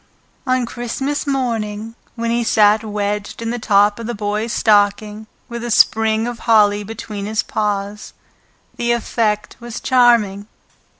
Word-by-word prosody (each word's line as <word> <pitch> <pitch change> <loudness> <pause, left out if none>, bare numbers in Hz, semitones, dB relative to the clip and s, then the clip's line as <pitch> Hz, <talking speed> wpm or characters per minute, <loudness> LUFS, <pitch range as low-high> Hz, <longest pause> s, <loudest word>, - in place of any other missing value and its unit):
On 255 -1 +1
Christmas 265 +5 -4
morning, 225 -5 -2 0.2
when 230 -1 -2
he 235 0 +1
sat 215 -1 +4
wedged 210 -1 -3
in 230 0 -3
the 240 - -3
top 205 0 +3
of 230 - -6
the 240 - -3
Boy's 210 +2 -2
stocking, 210 0 +1 0.2
with 235 0 -6
a 240 - -4
sprig 220 0 +3
of 240 -1 -5
holly 210 -2 +3
between 210 -1 -6
his 215 0 -1
paws, 205 -1 -3 0.6
the 240 0 +1
effect 215 -2 -1
was 235 -1 -7
charming. 230 -6 +3
220 Hz, 140 wpm, -18 LUFS, 210-235 Hz, 0.6 s, sat